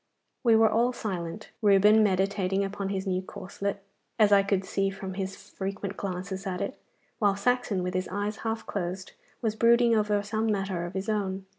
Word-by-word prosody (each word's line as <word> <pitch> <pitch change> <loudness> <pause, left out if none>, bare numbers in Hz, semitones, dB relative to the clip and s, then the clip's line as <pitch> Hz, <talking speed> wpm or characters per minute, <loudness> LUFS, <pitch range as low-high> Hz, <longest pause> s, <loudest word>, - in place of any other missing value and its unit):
We 230 -3 +5
were 220 0 +6
all 235 +3 +2
silent, 195 -3 -5
Reuben 210 +1 +6
meditating 195 -1 +1
upon 195 0 -4
his 190 0 -2
new 185 -1 0
corslet, 195 +1 -5 0.3
as 210 -2 +5
I 200 -1 +7
could 195 -1 0
see 195 0 0
from 190 -1 -6
his 190 0 -4
frequent 195 0 -5
glances 190 +1 -4
at 180 -1 -3
it; - - -4 0.4
while 205 -3 +3
Saxon, 225 -2 0
with 180 +1 -2
his 185 0 -1
eyes 205 +2 -3
half 225 0 -3
closed, 185 -1 -4 0.3
was 220 -2 0
brooding 235 +1 +5
over 210 -1 +1
some 220 +2 -1
matter 195 -4 -1
of 175 - -10
his 190 +1 -3
own. 195 -3 -1
200 Hz, 180 wpm, -28 LUFS, 190-215 Hz, 0.4 s, I